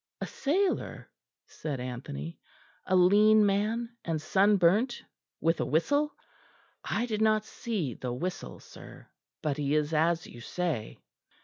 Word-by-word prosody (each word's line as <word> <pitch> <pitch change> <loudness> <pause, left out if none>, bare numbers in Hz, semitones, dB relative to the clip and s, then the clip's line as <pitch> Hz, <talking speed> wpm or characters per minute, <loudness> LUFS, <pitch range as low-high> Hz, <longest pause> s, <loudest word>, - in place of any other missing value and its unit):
"A - - -3
sailor?" 365 +7 -1 0.3
said 145 -4 -5
Anthony; 120 - -6 0.5
"a 185 - +2
lean 210 +4 +6
man, 220 +4 0
and 165 -2 -1
sunburnt, 200 - +3 0.4
with 165 +1 +1
a - - 0
whistle?" 285 - +1 0.7
"I 235 - -1
did 220 -3 -2
not 215 -1 +3
see 190 - -3
the 125 +1 -5
whistle, 175 +9 -5
sir; - - -13 0.3
but 145 -3 0
he 145 0 0
is 150 +1 0
as 165 +2 +2
you 120 - -11
say." 155 -4 -3
180 Hz, 130 wpm, -29 LUFS, 150-215 Hz, 0.7 s, lean